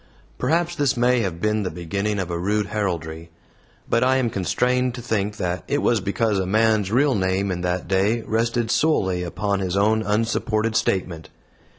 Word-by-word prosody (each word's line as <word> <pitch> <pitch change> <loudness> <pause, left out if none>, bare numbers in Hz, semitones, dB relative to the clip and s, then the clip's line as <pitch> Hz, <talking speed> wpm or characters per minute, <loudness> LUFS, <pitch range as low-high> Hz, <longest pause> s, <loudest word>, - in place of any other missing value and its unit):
Perhaps 170 +1 0
this 140 -4 +1
may 125 +1 +3
have 95 -6 -2
been 105 +2 0
the 95 - -2
beginning 100 +5 -3
of 90 -3 -3
a 85 - -2
rude 105 +3 0
heraldry; 85 -6 -3 0.6
but 115 - +2
I 130 +1 +3
am 120 -3 0
constrained 125 +6 0
to 120 - -7
think 105 -2 -1
that 90 0 -2
it 145 - 0
was 115 -4 +2
because 100 +1 0
a 95 - -1
man's 110 -1 +2
real 135 +4 +3
name 95 -1 0
in 90 -1 -3
that 90 0 -2
day 100 +5 +1
rested 115 +1 -1
solely 95 - +1
upon 100 +3 -2
his 95 0 -2
own 110 +2 +3
unsupported 110 +1 0
statement. 90 -7 -1
105 Hz, 180 wpm, -22 LUFS, 95-115 Hz, 0.6 s, may